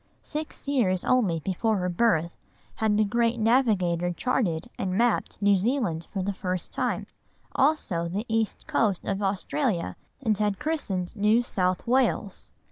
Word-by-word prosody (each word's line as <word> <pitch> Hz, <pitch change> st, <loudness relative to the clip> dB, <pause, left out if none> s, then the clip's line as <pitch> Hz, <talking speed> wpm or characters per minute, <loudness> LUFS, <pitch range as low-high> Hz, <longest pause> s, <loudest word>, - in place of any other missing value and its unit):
Six 305 Hz, -1 st, -6 dB
years 210 Hz, -10 st, +1 dB
only 210 Hz, -10 st, +2 dB
before 205 Hz, +5 st, 0 dB
her 180 Hz, -1 st, -1 dB
birth 175 Hz, -3 st, +1 dB, 0.4 s
had 215 Hz, -1 st, +2 dB
the 215 Hz, -, +4 dB
great 235 Hz, +2 st, +1 dB
navigator 205 Hz, -8 st, +2 dB
charted 175 Hz, -4 st, -1 dB
and 185 Hz, 0 st, -1 dB
mapped 235 Hz, 0 st, +1 dB
New 205 Hz, 0 st, +5 dB
Zealand 195 Hz, -, 0 dB
for 195 Hz, -2 st, -2 dB
the 200 Hz, +1 st, -1 dB
first 185 Hz, -2 st, -3 dB
time, -, -, -1 dB, 0.5 s
also 260 Hz, -, +1 dB
the 200 Hz, +6 st, -3 dB
east 225 Hz, -1 st, -1 dB
coast 205 Hz, -5 st, 0 dB
of 195 Hz, +1 st, -2 dB
Australia, 195 Hz, -, -1 dB, 0.2 s
and 225 Hz, -6 st, +1 dB
had 205 Hz, -1 st, 0 dB
christened 200 Hz, -, -2 dB
New 215 Hz, +3 st, +3 dB
South 185 Hz, -5 st, -1 dB
Wales. 240 Hz, -5 st, 0 dB
205 Hz, 145 wpm, -26 LUFS, 185-235 Hz, 0.5 s, New